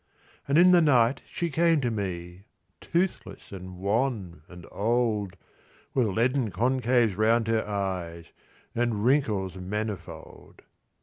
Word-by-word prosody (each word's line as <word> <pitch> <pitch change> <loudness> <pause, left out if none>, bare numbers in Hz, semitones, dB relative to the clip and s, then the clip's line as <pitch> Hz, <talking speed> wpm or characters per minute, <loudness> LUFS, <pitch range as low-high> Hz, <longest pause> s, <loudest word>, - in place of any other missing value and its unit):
And 140 +2 +2
in 180 +2 +7
the 175 -1 +6
night 130 -4 +3
she 170 -1 -3
came 165 +1 +3
to 120 -2 0
me, 90 -3 -5 0.3
Toothless, 175 +2 -3
and 95 -1 -9
wan, 100 - -1
and 90 -2 -12
old, 105 -3 0 0.6
With 125 -4 +2
leaden 120 +4 +1
concaves 120 +1 +1
round 110 +2 +2
her 115 -1 +1
eyes, 90 -5 -4 0.4
And 115 -3 -1
wrinkles 105 - +1
manifold. 105 +2 -7
110 Hz, 120 wpm, -27 LUFS, 95-130 Hz, 0.6 s, in